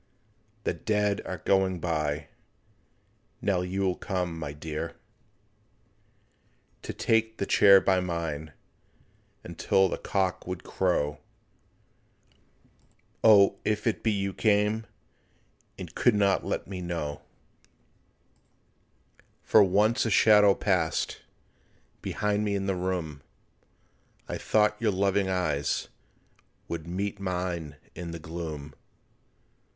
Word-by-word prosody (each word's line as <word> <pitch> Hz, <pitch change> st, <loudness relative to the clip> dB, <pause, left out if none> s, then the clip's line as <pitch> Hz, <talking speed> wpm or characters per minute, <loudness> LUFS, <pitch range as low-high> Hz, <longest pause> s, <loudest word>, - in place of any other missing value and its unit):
The -, -, 0 dB
dead 105 Hz, -1 st, 0 dB
are -, -, -4 dB
going 95 Hz, -2 st, +2 dB
by, 75 Hz, -3 st, -2 dB, 1.1 s
Now 95 Hz, -3 st, 0 dB
you 90 Hz, +2 st, -3 dB
will 95 Hz, -2 st, +2 dB
come, 90 Hz, -3 st, -3 dB
my 75 Hz, -3 st, -5 dB
dear, 80 Hz, +2 st, -5 dB, 1.9 s
To -, -, -5 dB
take 110 Hz, 0 st, +1 dB
the 100 Hz, -, -1 dB
chair 100 Hz, -1 st, +7 dB
by 95 Hz, -1 st, +2 dB
mine— 85 Hz, -4 st, -3 dB, 0.9 s
Until 95 Hz, 0 st, +1 dB
the -, -, -4 dB
cock 95 Hz, -2 st, -1 dB
would 90 Hz, -1 st, -5 dB
crow— 75 Hz, -6 st, 0 dB, 2.0 s
O, 100 Hz, -3 st, +6 dB
if 105 Hz, +2 st, -1 dB
it 115 Hz, -, 0 dB
be 115 Hz, -, +1 dB
you 100 Hz, -1 st, -1 dB
came 105 Hz, +1 st, +1 dB, 0.9 s
And -, -, -8 dB
could 120 Hz, -4 st, +3 dB
not 100 Hz, -1 st, +2 dB
let -, -, -3 dB
me 95 Hz, -2 st, -6 dB
know, 85 Hz, -4 st, -4 dB, 2.2 s
For 110 Hz, -, +6 dB
once 105 Hz, +6 st, +2 dB
a 115 Hz, -, 0 dB
shadow 105 Hz, -1 st, +6 dB
passed 90 Hz, -6 st, 0 dB, 0.8 s
Behind 105 Hz, 0 st, -1 dB
me 105 Hz, -1 st, 0 dB
in 100 Hz, -1 st, -2 dB
the 95 Hz, -, 0 dB
room, 90 Hz, -6 st, -3 dB, 1.1 s
I -, -, -4 dB
thought 105 Hz, 0 st, +2 dB
your 115 Hz, -, +2 dB
loving 100 Hz, 0 st, +1 dB
eyes 85 Hz, -6 st, -1 dB, 0.8 s
Would 85 Hz, -1 st, -5 dB
meet 100 Hz, +3 st, -3 dB
mine 90 Hz, -5 st, -3 dB, 0.2 s
in 85 Hz, 0 st, -7 dB
the 85 Hz, -, -5 dB
gloom. 80 Hz, -2 st, -6 dB
95 Hz, 110 wpm, -28 LUFS, 85-100 Hz, 2.2 s, chair